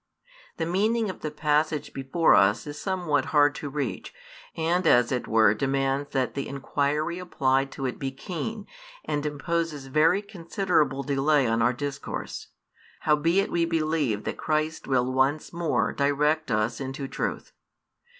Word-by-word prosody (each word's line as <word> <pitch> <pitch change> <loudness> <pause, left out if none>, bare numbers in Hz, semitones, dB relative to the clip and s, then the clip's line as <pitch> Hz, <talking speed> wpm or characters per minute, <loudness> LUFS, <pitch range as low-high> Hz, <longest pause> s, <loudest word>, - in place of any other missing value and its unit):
The 165 - -1
meaning 210 +5 +1
of - - -13
the 155 - -2
passage 150 0 0
before 135 +5 +2
us 105 +3 +4
is 145 0 -7
somewhat 175 -8 0
hard 145 -1 +4
to 145 - -6
reach, 135 -9 -4 0.5
and 165 +2 +1
as 120 -2 +5
it 125 -2 -2
were 110 -2 +5
demands 135 +3 -1
that 130 -3 -1
the 140 - -3
inquiry 145 +4 -1
applied 135 -6 0
to 135 - -4
it 125 - -3
be 135 - -2
keen, 180 +10 -5 0.4
and 145 -1 -1
imposes 150 0 -2
very 155 +8 +3
considerable 175 -7 0
delay 140 0 +2
on 115 0 +1
our 120 +2 +4
discourse: 140 +2 -5 0.5
howbeit 165 +6 +2
we 170 - +1
believe 155 -9 0
that - - -4
Christ 155 0 -1
|311 - - -15
will 130 -1 +1
once 135 +5 +1
more 170 -2 0
direct 150 +2 +1
us 115 +2 0
into 135 +1 -4
truth. - - -4
145 Hz, 150 wpm, -26 LUFS, 135-165 Hz, 0.5 s, as